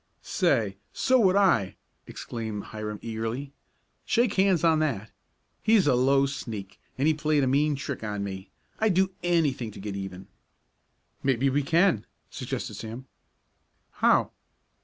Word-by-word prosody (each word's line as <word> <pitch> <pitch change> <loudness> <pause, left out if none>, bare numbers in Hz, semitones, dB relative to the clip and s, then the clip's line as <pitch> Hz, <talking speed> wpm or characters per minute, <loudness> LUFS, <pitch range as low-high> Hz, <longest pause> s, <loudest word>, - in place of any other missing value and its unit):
"Say, - - +1 0.2
so 260 0 +3
would 190 -4 +4
I!" 180 - +3 0.3
exclaimed 110 -3 -5
Hiram 105 -1 -6
eagerly. 115 +5 -4 0.5
"Shake 235 -3 +2
hands 190 -4 +3
on 160 -2 +4
that. 115 -9 -1 0.5
He's 220 -3 +4
a 145 - +4
low 135 +2 +4
sneak, 115 -8 -6 0.2
and 140 +3 +2
he 160 - +4
played 150 -1 +1
a - - +2
mean 145 +3 +2
trick 140 -3 -5
on 105 -2 -3
me. 95 -1 -6 0.3
I'd 215 -4 +2
do 190 +1 +3
anything 155 -9 +1
to 105 - -11
get 100 0 -5
even." 95 -1 -7 0.9
"Maybe 135 0 +2
we 145 +2 +2
can," 165 - +2 0.2
suggested - - -4
Sam. 115 +4 -7 0.9
"How?" - - +3
135 Hz, 140 wpm, -27 LUFS, 110-165 Hz, 0.9 s, would